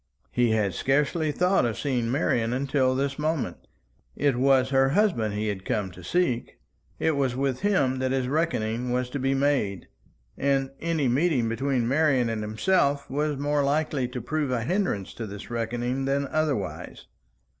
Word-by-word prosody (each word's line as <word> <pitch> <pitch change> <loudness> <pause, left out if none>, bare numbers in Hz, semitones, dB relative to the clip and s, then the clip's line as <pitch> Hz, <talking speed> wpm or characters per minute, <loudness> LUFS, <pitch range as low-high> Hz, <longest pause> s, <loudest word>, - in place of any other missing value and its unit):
He 120 -1 +2
had 105 -4 +1
scarcely 150 - +1
thought 180 +5 +2
of 115 -2 -1
seeing 125 -5 -1
Marian 120 -3 +1
until 130 0 +1
this 140 +1 -1
moment. 155 -1 -2 0.5
It 140 -2 +1
was 130 0 +3
her 135 0 +4
husband 135 - +1
he 105 +1 -1
had 95 -2 -4
come 95 -2 -2
to 90 0 -12
seek; 130 - -1 0.4
it 160 - +1
was 135 -3 0
with 135 -1 -1
him 140 -11 +1
that 130 0 0
his 130 -1 0
reckoning 125 -6 -1
was 125 0 -1
to 140 - -3
be 135 +1 +1
made; 135 -9 0 0.5
and 135 -1 +1
any 160 -4 0
meeting 130 -1 +2
between 125 +1 0
Marian 135 -3 +2
and 110 -1 -2
himself 140 - +1
was 150 +1 -1
more 145 +1 +1
likely 140 -2 0
to 125 0 -6
prove 145 +4 -2
a 125 -3 -1
hindrance 175 - -1
to 115 - -6
this 100 +3 -9
reckoning 120 +3 -2
than 140 +1 0
otherwise. 150 -10 -2
135 Hz, 165 wpm, -26 LUFS, 120-145 Hz, 0.5 s, her